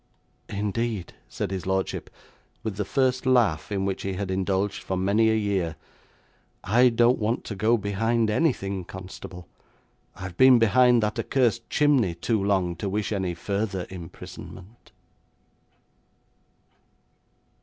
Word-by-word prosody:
'Indeed,' 105 -1 -2 0.2
said - - -4
his 95 -1 -4
lordship, 95 0 -1 0.5
with 110 -3 -4
the 105 - -1
first 130 +2 +1
laugh 110 -11 +2
in 95 -1 -1
which 95 -1 -2
he 95 - -3
had 95 0 -3
indulged 95 +1 -1
for 95 - -3
many 100 +4 +3
a 110 - +3
year. 100 -6 -1 0.9
'I 120 +5 +5
don't 120 +2 +3
want 110 +2 -1
to 105 - -6
go 110 +4 +3
behind 110 +3 0
anything, 100 - 0
constable, 90 -1 -9 0.7
I've 95 -2 -8
been 130 -1 +7
behind 120 +1 +4
that 105 0 -1
accursed 120 -4 0
chimney 135 - +2
too 105 +4 0
long 95 -3 +1
to 100 +3 -3
wish 105 +2 -2
any 95 -4 -1
further 100 +1 -2
imprisonment.' 95 +4 -11
100 Hz, 130 wpm, -25 LUFS, 95-115 Hz, 0.9 s, been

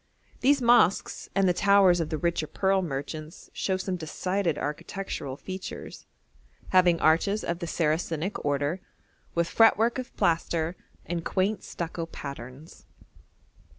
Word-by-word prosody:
These 275 0 +3
mosques 235 -6 +3
and 195 -1 +3
the 180 - +4
towers 195 -1 +5
of 160 -2 -1
the 155 - -2
richer 170 -1 -1
pearl 190 +3 +1
merchants 155 +1 -6
show 190 -1 -1
some 185 -1 -3
decided 175 +1 -1
architectural 150 -3 -4
features, 185 +3 -8 0.6
having 180 -2 +4
arches 185 +7 +2
of 170 0 -2
the 170 - -4
Saracenic 165 +3 -1
order, 145 +5 0 0.5
with 170 0 +2
fretwork 225 +3 +4
of 255 - -8
plaster 165 0 +1 0.3
and 170 -1 -3
quaint 195 +5 0
stucco 165 -1 -5
patterns. 140 0 -9
175 Hz, 125 wpm, -27 LUFS, 160-195 Hz, 0.6 s, towers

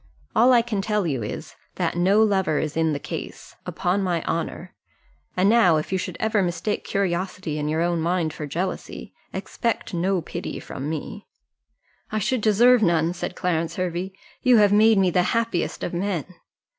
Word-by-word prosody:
All 240 +3 +6
I 240 -2 +5
can 220 -4 -2
tell 210 -1 0
you 135 -7 -1
is, 105 - -6 0.2
that - - -1
no 195 +5 +4
lover 190 -7 +1
is 155 - -2
in 160 -1 +2
the 145 - -1
case, - - -7
upon 185 +3 0
my 175 -4 -1
honour 170 +2 -3 0.6
and 185 +2 +4
now, 205 -7 +5
if 155 - -4
you 190 - +1
should - - -5
ever 220 -2 +1
mistake 175 +3 -2
curiosity 185 -4 -2
in 150 0 -2
your 160 +2 +1
own 170 -1 0
mind 170 -2 0
for 150 - -6
jealousy, 180 +6 -4 0.2
expect 230 -4 -3
no 180 +2 +1
pity 165 - -6
from 140 +3 -6
me." 160 +6 -6 0.8
"I 215 - -1
should 215 +3 0
deserve 235 +3 +5
none," 170 -3 +2
said 180 0 -5
Clarence 165 -2 -1
Hervey; 185 +1 -3 0.3
"you 250 -3 +5
have 205 -1 +5
made 215 +1 +5
me 190 -2 +3
the 180 - +3 0.2
happiest 180 -9 -1
of - - -3
men." 180 -3 -1
185 Hz, 180 wpm, -24 LUFS, 165-210 Hz, 0.8 s, All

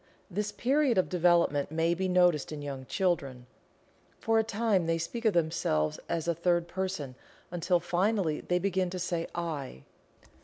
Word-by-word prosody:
This 210 +3 -2
period 270 -1 +2
of 185 - +2
development 175 -5 +2
may 165 +2 +1
be 185 +2 -1
noticed 180 -5 +3
in 150 -1 -6
young 135 -2 -6
children. 140 -10 -1 0.7
For 225 0 +2
a - - +3
time 215 -5 +1
they 165 0 +1
speak 230 +8 -5
of 220 - +4
themselves 155 - 0
as 170 -1 -2
a 170 - +2
third 170 +1 +1
person, 185 -8 -3 0.4
until 175 +1 +1
finally 175 -1 0
they 180 - 0
begin 185 0 0
to 185 - -5
say 170 -1 -2
"I." 150 - -4
175 Hz, 160 wpm, -29 LUFS, 160-190 Hz, 0.7 s, of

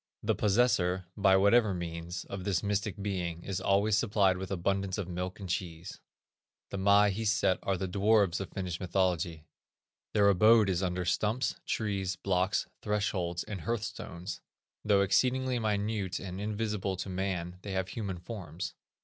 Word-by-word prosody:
The - - +2
possessor, 95 -4 +2
by 95 -2 +5
whatever 100 +1 +4
means, 85 0 -5
of 100 -2 -6
this 95 -1 0
mystic 105 0 -1
being, 90 -4 -3
is 95 -2 -3
always 100 +2 +3
supplied 100 -4 +3
with 95 0 -5
abundance 95 +1 -1
of 100 -4 -3
milk 90 +2 -4
and 100 - -6
cheese. 85 -1 -4 0.7
The 100 - -3
Maahiset 100 0 +3
are 95 -1 0
the 95 +1 -2
dwarfs 100 -1 +3
of 95 - -5
Finnish 90 -3 -4
mythology. 90 -4 0 0.7
Their 105 -2 +4
abode 110 +1 +5
is 90 0 0
under 90 -1 -1
stumps, 105 +8 +1
trees, 100 -4 -1
blocks, 95 +1 0 0.2
thresholds 95 -5 -1
and 100 -5 -6
hearth 115 +6 -1
stones. 90 -3 -6 0.4
Though 100 -2 +4
exceedingly 130 +5 +2
minute 105 -3 -1
and 95 +1 -6
invisible 105 -2 -2
to 95 - -4
man 90 -2 -3
they 100 -1 -5
have 95 0 -1
human 100 -5 -4
forms. 90 -3 -6
95 Hz, 150 wpm, -30 LUFS, 90-105 Hz, 0.7 s, by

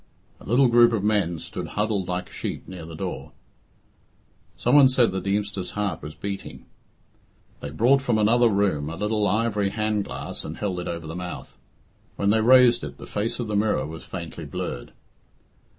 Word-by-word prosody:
A - - -14
little 125 +5 +4
group 120 0 +5
of 105 -3 0
men 100 -5 +1
stood - - -6
huddled 105 -3 0
like 90 0 -3
sheep - - -6
near 90 -3 -8
the 80 - -8
door. - - -5 1.2
Some - - +1
one 140 -2 +9
said 130 -2 +3
the 95 0 -3
Deemster's 100 -2 -2
heart 100 -6 -1
was 75 +1 -8
beating. 100 +5 -6 0.9
They 70 - -6
brought 120 - +3
from 120 -4 +1
another 115 +3 +4
room 95 -8 +1
a 80 - -5
little 105 +2 0
ivory 105 0 +1
hand 105 -1 -1
glass - - -6
and - - -7
held 95 -4 -2
it 90 - -5
over 85 -1 -4
the 80 +2 -6
mouth. 90 -2 -7 0.6
When 100 0 +1
they 110 +1 +3
raised 125 +1 +6
it - - -7
the - - -10
face 105 +4 -2
of 120 - -2
the 105 - -2
mirror 105 +1 +1
was 80 +1 -8
faintly 85 -3 -7
blurred. - - -5
105 Hz, 180 wpm, -24 LUFS, 90-115 Hz, 1.2 s, one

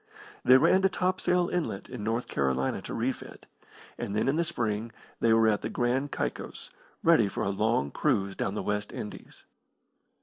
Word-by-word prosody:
They 130 +1 +8
ran 185 +8 +4
to 195 - +4
Topsail 180 -1 +1
Inlet 165 - -2
in 120 -4 -7
North 115 +3 -1
Carolina 65 -1 0
to - - -7
refit, - - -4 0.5
and 100 - -3
then 110 - +1
in 135 - +2
the 170 - +2
spring 115 -8 -2 0.3
they 115 - +3
were 115 0 +5
at 105 -2 +2
the - - -3
Grand 130 +3 0
Caicos, - - -4 0.3
ready 160 -11 +5
for - - -3
a - - 0
long 100 -8 +1
cruise 100 -9 0
down 95 - -2
the - - -2
West 105 0 -2
Indies. 105 - -9
115 Hz, 175 wpm, -28 LUFS, 105-150 Hz, 0.5 s, They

